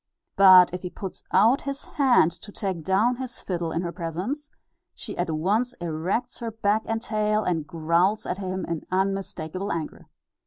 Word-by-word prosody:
But 185 -2 +8
if 180 - -4
he 180 - -5
puts 190 +1 -8
out 225 +8 +4
his 275 0 -5
hand 250 - +3
to 205 +4 -9
take 190 -6 -3
down 215 +8 +2
his 255 -2 -6
fiddle 170 -3 -3
in 170 - -1
her 170 - -3
presence, 185 - -4 0.5
she - - -6
at 175 0 -2
once 200 +10 0
erects 175 +9 -2
her 235 -2 -3
back 215 -1 +1
and 225 0 -1
tail, 215 -1 0
and 165 -4 -1
growls 170 +5 +1
at 185 - -3
him, 185 -1 -3
in 165 -2 -3
unmistakable 190 -1 -2
anger. 160 -2 -5
190 Hz, 170 wpm, -25 LUFS, 170-220 Hz, 0.5 s, But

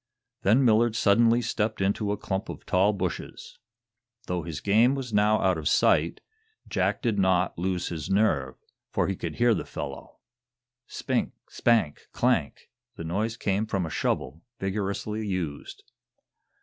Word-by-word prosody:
Then 120 +7 +4
Millard 115 0 +4
suddenly 115 +3 +4
stepped 110 -1 -1
into 100 +1 0
a 105 - -1
clump 95 +1 -3
of - - -8
tall 95 +3 +3
bushes. 100 - -5 0.7
Though 90 -1 -2
his 80 -3 -6
game 115 +6 +3
was 130 -4 -5
now 105 +1 +3
out 95 -3 +1
of 75 - -1
sight, 80 +3 +2 0.5
Jack - - -1
did 110 -5 +1
not 95 -1 +2
lose 90 -1 -1
his 80 -4 -5
nerve, 80 -11 +1 0.3
for - - 0
he 95 - -1
could 85 -3 -5
hear 120 -1 +4
the - - -2
fellow. - - -7 0.7
Spink! - - -2 0.2
spank! 115 -11 +1
clank! - - 0 0.2
The - - -7
noise 105 +7 -2
came 100 +2 -1
from 95 -4 -1
a 80 - -6
shovel, 70 +6 -2 0.2
vigorously 105 +2 -3
used. 85 -7 -4
100 Hz, 150 wpm, -27 LUFS, 90-110 Hz, 0.7 s, Then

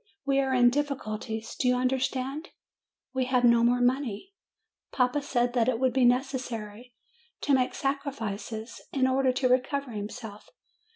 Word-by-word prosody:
We 275 -1 +2
are 270 -1 +1
in 245 -2 +5
difficulties 225 -5 -3
do 255 - 0
you 250 - +4
under 255 +1 +1
stand? 270 +6 -3 0.6
We 260 -1 0
have 250 -1 +1
no 235 -1 +5
more 245 +1 +3
money. 255 - -1 0.6
Papa 250 +3 +1
said 245 -3 0
that 240 -1 +2
it 235 -3 0
would 260 -1 +2
be 260 -1 +3
necessary 245 -3 -1 0.5
to 285 - +1
make 255 -1 +2
sacrifices 235 -5 -4
in 265 -2 +1
order 260 0 +2
to 255 0 +1
recover 260 +1 0
himself. 215 0 -7
250 Hz, 155 wpm, -28 LUFS, 235-270 Hz, 0.6 s, in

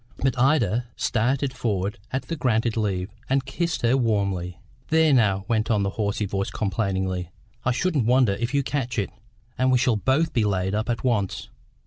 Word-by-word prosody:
But 135 -2 0
Ida 120 -4 +2
started 130 +4 0
forward 100 -6 -2
at 130 - -2
the 165 - -4
granted 115 -5 +1
leave, 100 -3 -1 0.2
and 135 0 +1
kissed 165 +3 -2
her 120 +2 +4
warmly. 100 -7 0 0.3
"There 160 -2 +4
now," 100 -6 +3
went 115 0 0
on 105 -3 +2
the 100 - -1
hoarse 100 0 -2
voice 100 -1 -1
complainingly, 95 -3 -2 0.4
"I 130 - +3
shouldn't 140 -3 0
wonder 125 -4 +4
if 120 +5 -2
you 140 -1 +1
catch 130 -4 -2
it, 100 -3 -1 0.5
and 130 0 +3
we 130 - +5
shall 120 -2 +2
both 135 +9 +1
be 115 - +2
laid 95 -2 0
up 110 +3 -1
at 115 -2 -1
once. 110 -7 -1
115 Hz, 180 wpm, -24 LUFS, 100-130 Hz, 0.5 s, we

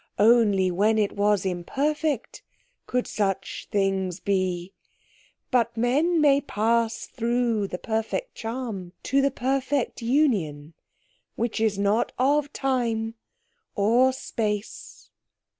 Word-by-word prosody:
Only 205 -4 +4
when 210 +5 +2
it 210 -2 +1
was 205 -1 +2
imperfect 275 - -2 0.5
could 250 0 0
such 195 -2 -2
things 195 -2 0
be. 185 -2 -1 0.8
But 235 -2 +1
men 295 +9 +2
may 285 -2 +4
pass 230 -1 0
through 235 -3 0
the 180 - -5
perfect 225 - -3
charm 225 -6 -5
to 275 +1 +2
the 275 - +3
perfect 270 0 -1
union, 200 - 0 0.6
which 230 -1 -2
is 215 -3 +1
not 205 +3 +1
of 285 +3 +2
time 235 -5 -1 0.6
or 235 +6 +4
space." 215 -5 -5
225 Hz, 110 wpm, -25 LUFS, 200-260 Hz, 0.8 s, Only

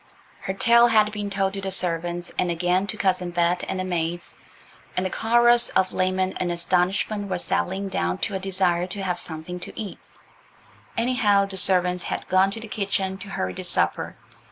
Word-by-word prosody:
Her 190 - -4
tale 235 +3 +5
had 215 -2 +4
been 205 -1 -4
told 195 -1 0
to 195 - -5
the 195 - -3
servants, 175 -1 -2
and 180 - +1
again 180 +3 +1
to 215 - -4
Cousin 185 -3 0
Bet 175 0 +1
and 190 - -3
the - - -1
maids, 175 -1 -3 0.6
and 185 - +1
the 185 - -2
chorus 240 +1 +4
of 185 0 +1
lament 185 0 0
and 175 -1 -1
astonishment 185 +4 0
was 180 -2 -2
settling 195 +2 -1
down 90 - -1
to - - -5
a 190 - -1
desire 185 -2 +1
to 195 +1 -3
have 180 -2 -1
something 160 +2 -5
to - - -6
eat; 210 -3 -6 1.0
anyhow, 230 -4 +3
the 195 -1 -7
servants 180 -1 +3
had - - -4
gone 185 +1 +4
to 200 - -6
the 225 - -7
kitchen 195 -2 -2
to 200 - -9
hurry 95 - -3
the - - -7
supper. - - 0
190 Hz, 190 wpm, -24 LUFS, 180-200 Hz, 1.0 s, tale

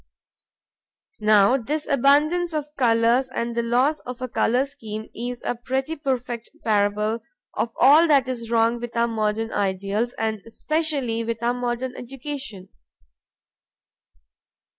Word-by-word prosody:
Now 215 +3 +5
this 295 +5 -3
abundance 300 +5 +3
of 300 0 -4
colors 235 +1 +3
and 235 -2 -3
loss 245 +6 +1
of 250 0 -8
a 255 - -3
color 250 +2 +1
scheme 220 -6 -7
is 245 +1 -5
a - - 0
pretty 265 +6 -3
perfect 250 -5 -3
parable 210 +1 +1 0.3
of 235 - -1
all 300 +6 +7
that 280 -4 +4
is 235 -3 -4
wrong 230 0 +2
with 235 0 -6
our 235 0 +3
modern 220 0 -1
ideals 200 +4 -1
and 220 -2 -2
especially 275 -3 -1
with 230 0 -4
our 240 +1 +2
modern 245 +1 -3
education. 260 -6 -7
240 Hz, 125 wpm, -23 LUFS, 225-270 Hz, 0.3 s, all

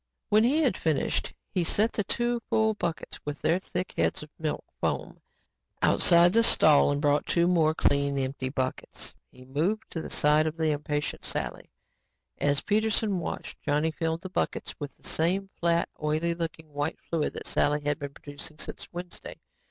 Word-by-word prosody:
When 215 +1 +5
he 290 +7 +3
had 250 -10 +2
finished, 155 -4 0 0.2
he 180 - +1
set 215 +7 +2
the 210 - 0
two 240 +4 0
full 220 0 +3
buckets 170 -6 -4
with 145 0 -5
their 170 +3 +3
thick 180 -1 -4
heads - - 0
of 150 - -13
milk 155 -2 -2
foam, - - -2 0.6
outside 170 +1 +5
the 230 - +5
stall 155 -11 +6
and 145 - 0
brought 145 0 +2
two 170 0 +3
more 160 -3 +3
clean, 140 -2 +2
empty 130 -1 -2
buckets. 130 -1 -3 0.2
He 130 - -15
moved 165 +12 -1
to 165 - -3
the - - -7
side 150 +1 +3
of 155 +1 -4
the 160 -1 +2
impatient 145 0 -2
Sally. - - -4 0.7
As 145 -1 +2
Peterson 215 -2 +1
watched, - - -6
Johnny 150 +2 +1
filled 160 +1 -2
the 185 - -7
buckets - - -2
with 145 -2 -7
the - - -8
same, 190 +4 +1
flat, 170 0 +2
oily 155 +3 +1
looking 160 -2 -6
white 145 +3 -2
fluid 165 -3 -2
that - - -7
Sally 150 0 +1
had 145 +1 -1
been 140 -1 -6
producing 145 +2 -8
since - - -6
Wednesday. 175 +1 -7
160 Hz, 175 wpm, -28 LUFS, 145-180 Hz, 0.7 s, stall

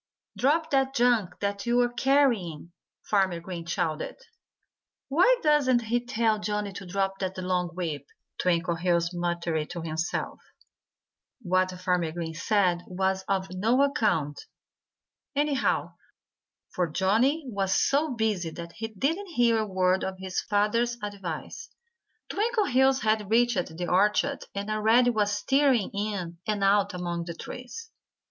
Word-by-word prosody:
"Drop 315 +5 +1
that 270 -1 +1
junk 235 -8 +2
that 200 +2 -2
you're 240 0 +2
carrying!" 240 - +1 0.3
Farmer 190 -4 +1
Green 170 -1 -7
shouted. 170 -3 -2 0.9
"Why 360 - +5
doesn't 275 -6 +3
he 240 +2 0
tell 225 -3 +1
Johnnie 210 -1 -2
to 195 -1 -8
drop 195 +1 -1
that 190 -1 -3
long 180 -1 0
whip?" 155 -6 -4 0.3
Twinkleheels 170 0 +1
muttered 170 -3 -2
to 175 -1 -5
himself. 160 +1 -3 1.0
What 185 0 +2
Farmer 180 -3 0
Green 165 -1 -5
said 180 +1 +1
was 190 +1 -1
of 190 -1 -1
no 225 +9 +2
account, 210 - 0 0.9
anyhow, 290 -1 0 0.8
for 180 -1 0
Johnnie 225 - +2
was 195 -5 -1
so 285 -1 +1
busy 210 -7 0
that 170 +1 -8
he 225 +5 -5
didn't 295 - -2
hear 240 -8 +2
a 215 - -1
word 185 -1 +1
of 190 0 -3
his 190 0 -3
father's 230 +4 +1
advice. 200 - -6 0.6
Twinkleheels 375 - +2
had 215 -2 +1
reached 225 -8 +1
the 175 0 -3
orchard 210 +9 +2
and 200 +2 -3
already 225 +3 +4
was 205 -2 0
tearing 270 -6 +3
in 200 -5 -4
and 210 -2 0
out 200 -1 +3
among 175 -1 -3
the 170 -1 -6
trees. 255 - -8
200 Hz, 130 wpm, -27 LUFS, 180-245 Hz, 1.0 s, Why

